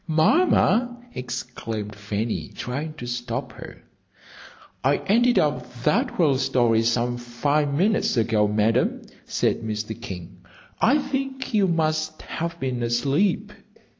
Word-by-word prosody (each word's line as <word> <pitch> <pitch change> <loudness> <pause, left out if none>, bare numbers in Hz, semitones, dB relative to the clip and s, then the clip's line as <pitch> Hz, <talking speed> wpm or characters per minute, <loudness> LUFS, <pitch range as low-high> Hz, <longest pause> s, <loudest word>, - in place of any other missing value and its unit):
"Mamma!" 240 - +3 0.2
exclaimed 120 -4 -5
Fanny, 105 +2 -3
trying 145 +5 -4
to 120 - -7
stop 120 +1 -3
her. - - -11 1.0
"I 140 +3 +3
ended 240 +4 +4
up 125 -5 +1
that 150 - +1
whale 145 -7 +3
some 120 -2 +2
five 140 +5 0
minutes 190 - +2
ago, 110 -2 +3
Madam," 105 +2 +1 0.2
said - - 0
Mr. 110 0 -4
King. 90 -5 -8 0.4
"I 260 +6 +4
think 270 -2 -3
you 205 -3 +4
must 155 -2 0
have 170 +1 -4
been 130 -2 -2
asleep." 135 - +1
130 Hz, 115 wpm, -24 LUFS, 115-170 Hz, 1.0 s, ended